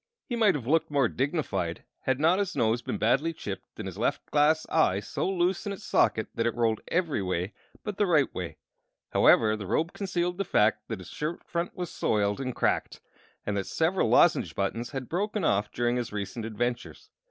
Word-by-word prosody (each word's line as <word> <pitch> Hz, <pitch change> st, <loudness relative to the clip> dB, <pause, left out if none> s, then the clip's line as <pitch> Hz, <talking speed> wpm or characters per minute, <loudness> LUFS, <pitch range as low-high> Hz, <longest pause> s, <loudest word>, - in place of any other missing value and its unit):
He 240 Hz, -, -3 dB
might 215 Hz, -6 st, +4 dB
have 130 Hz, -6 st, -4 dB
looked 160 Hz, +5 st, +2 dB
more 140 Hz, -4 st, +3 dB
dignified 115 Hz, -, -2 dB, 0.2 s
had 130 Hz, 0 st, +1 dB
not 165 Hz, +5 st, +4 dB
his 200 Hz, -3 st, -1 dB
nose 115 Hz, +1 st, +2 dB
been -, -, -3 dB
badly 135 Hz, +9 st, +2 dB
chipped 100 Hz, -10 st, -7 dB
and -, -, -5 dB
his -, -, -7 dB
left -, -, 0 dB
glass 150 Hz, +2 st, +3 dB
eye 100 Hz, -12 st, +3 dB
so 105 Hz, -, -2 dB
loose 185 Hz, +1 st, 0 dB
in 200 Hz, -, -2 dB
its 200 Hz, -, -10 dB
socket 110 Hz, -, +2 dB
that 115 Hz, 0 st, 0 dB
it 115 Hz, -, -1 dB
rolled 115 Hz, -2 st, +1 dB
every 170 Hz, -, 0 dB
way 90 Hz, +1 st, -2 dB, 0.3 s
but 210 Hz, -2 st, -4 dB
the 205 Hz, -, +2 dB
right 155 Hz, -5 st, +3 dB
way; -, -, -5 dB, 0.5 s
however, 110 Hz, -1 st, +5 dB
the 105 Hz, -3 st, -6 dB
robe 165 Hz, -, 0 dB
concealed 180 Hz, -2 st, -2 dB
the -, -, +2 dB
fact 105 Hz, -, +2 dB
that 110 Hz, -, -4 dB
his 90 Hz, -2 st, -11 dB
shirt 155 Hz, +3 st, -4 dB
front 170 Hz, 0 st, -3 dB
was 180 Hz, -2 st, -4 dB
soiled 105 Hz, +3 st, 0 dB
and 130 Hz, -2 st, -3 dB
cracked, -, -, 0 dB, 0.5 s
and 105 Hz, -, -1 dB
that 100 Hz, -2 st, -2 dB
several 170 Hz, +4 st, +1 dB
lozenge 95 Hz, -, +4 dB
buttons 115 Hz, +5 st, -2 dB
had 135 Hz, -3 st, -5 dB
broken 205 Hz, +3 st, -1 dB
off 100 Hz, -5 st, +1 dB
during 120 Hz, 0 st, 0 dB
his 120 Hz, -2 st, -3 dB
recent 105 Hz, +2 st, -4 dB
adventures. 120 Hz, +2 st, -4 dB
135 Hz, 200 wpm, -28 LUFS, 110-175 Hz, 0.5 s, however